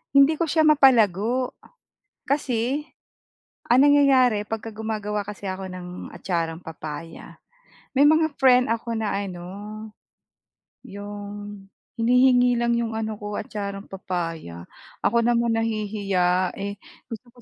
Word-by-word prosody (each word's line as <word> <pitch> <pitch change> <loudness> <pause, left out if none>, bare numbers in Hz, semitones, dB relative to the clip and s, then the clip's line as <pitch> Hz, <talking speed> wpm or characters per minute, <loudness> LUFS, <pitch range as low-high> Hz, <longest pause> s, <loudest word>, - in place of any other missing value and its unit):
hindi 280 +3 +5
ko 335 - +1
siya 315 +1 +2
mapalago. 250 - +4 0.7
Kasi, 265 -1 0 0.9
ang 245 +2 +6
nangyayari 265 -7 +4
pagka 225 0 -4
gumagawa 210 -1 -3
kasi 205 0 -8
ako 190 0 -5
ng 180 -1 -8 0.3
atcharang 165 -2 -3
papaya, 160 0 -9 0.6
may 275 - +5
mga 315 0 +3
friend 255 -1 +5
ako 230 +1 -2
na 215 -2 -1
ano, 195 -3 -4 1.4
yung 205 0 -8 0.3
hinihingi 250 +1 +4
lang 235 0 +1
yung 230 -1 -2
ano 220 -1 -3
ko, 210 0 -5
atcharang 200 -1 -6
papaya. 165 - -5 0.4
Ako 235 0 +3
naman 235 -1 +2
nahihiya, 200 -5 0
eh, 200 +1 -4 0.3
gusto 240 +1 -9
ko - - -18
220 Hz, 115 wpm, -24 LUFS, 195-250 Hz, 1.4 s, ang